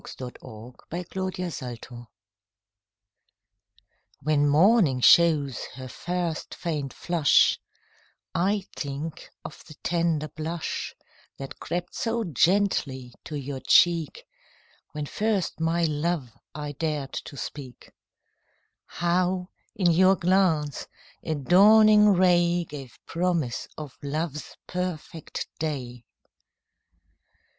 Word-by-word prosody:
MORNING, 125 -2 -6 0.8
NOON 190 0 -1
AND 180 -4 -4
NIGHT 120 -3 -7 2.4
When 145 0 +2
morning 165 - +4
shows 150 -2 +5
her 130 0 -7
first 175 +3 -4
faint 150 -5 -3
flush, 165 -1 +3 0.7
I 195 +3 +1
think 145 +2 -5 0.2
of - - -9
the 155 - -12
tender 165 -3 0
blush 160 +3 -4 0.4
That 135 -1 -8
crept 175 0 -4
so 230 0 -1
gently 165 - +1
to 150 - -6
your 140 -1 -5
cheek 170 - +3 0.7
When 150 -1 -3
first 205 +1 -1
my 165 +1 +1
love 155 -4 -1 0.2
I 150 -1 -4
dared 150 -2 -3
to 140 - -10
speak; 130 -3 -8 1.0
How, 180 +1 0 0.3
in 180 -4 +3
your 185 +3 +5
glance, 170 -6 +1 0.3
a 155 - -2
dawning 210 +8 +6
ray 175 -2 +3
Gave 135 -5 -9
promise 170 -8 -1
of 150 -4 -7
love's 150 +1 -4
perfect 180 -3 -5
day. 125 -6 -4
165 Hz, 100 wpm, -26 LUFS, 145-180 Hz, 2.4 s, dawning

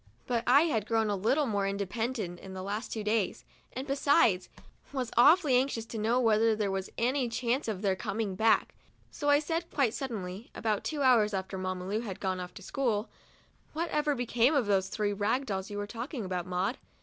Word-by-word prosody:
But 235 -2 0
I 265 +4 +7
had 225 - 0
grown 225 -2 +1
a - - +1
little 245 +10 +2
more 200 -5 0
independent 200 -1 -3
in 190 0 -9
the 185 - -5
last 205 +4 -4
two 220 - -3
days, 210 -2 -1 0.3
and 260 +2 -5
besides, 275 - +3 0.4
was 255 -4 -3
awfully 300 +3 +6
anxious 250 -3 +1
to 225 -1 -6
know 230 +4 +2
whether 225 -1 +3
there 210 -2 -1
was 195 0 -3
any 250 +1 +1
chance 240 +3 -1
of 210 -2 -3
their 195 -2 +2
coming 205 0 -3
back; 220 +4 +2 0.4
so 290 -2 -2
I 290 - +7
said, 325 +3 -2
quite 265 -6 +1
suddenly, 215 -5 -5
about 215 -3 -1
two 295 -3 -2
hours 220 -5 +4
after 190 0 -4
Mamma 185 -1 -3
Lu 210 +3 -1
had 210 -5 -6
gone 185 -2 -2
off 180 0 -7
to 195 - -10
school: 230 -2 -1 0.6
"What 330 +2 -2
ever 300 -1 +1
became 245 +3 +2
of 270 -5 +2
those 195 -2 +2
three 205 0 -1
rag 220 +7 0
dolls 190 -4 -3
you 205 - -5
were 205 - -2
talking 235 - -5
about, 180 -1 -3
Maud 185 +6 -1
220 Hz, 205 wpm, -30 LUFS, 195-255 Hz, 0.6 s, I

